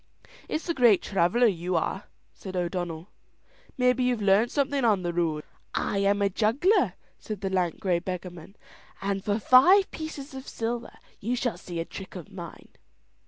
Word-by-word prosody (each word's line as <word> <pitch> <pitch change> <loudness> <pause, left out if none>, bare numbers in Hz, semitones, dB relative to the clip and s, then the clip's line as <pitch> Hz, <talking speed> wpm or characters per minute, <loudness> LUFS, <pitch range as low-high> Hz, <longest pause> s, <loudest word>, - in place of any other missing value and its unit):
"It's 310 - -2
the 335 - 0
great 240 - +5
traveller 195 +6 +2
you 180 -4 0
are," 190 +4 -1 0.3
said 190 -2 -9
O'Donnell. 175 -1 -3 0.7
"Maybe 250 0 +3
you've 250 -2 +1
learnt 205 +3 +3
something 280 -1 0
on 210 -5 +3
the 175 0 -2
road." 160 -3 0 0.3
"I 200 - 0
am 200 +1 +2
a 200 - +3
juggler," 245 - +2 0.3
said 210 -3 -6
the 195 -1 -2
lank 180 -3 0
grey 180 -3 +1
beggarman, 180 0 -7 0.5
"and 195 -1 -1
for 205 0 0
five 315 - +6
pieces 300 -3 -7
of 265 0 -8
silver 235 +1 -4 0.2
you 235 +5 -1
shall 245 -1 -2
see 175 -2 -6
a 165 - -2
trick 190 +4 -9
of 185 +3 -9
mine." 175 -4 -9
200 Hz, 165 wpm, -27 LUFS, 180-245 Hz, 0.7 s, five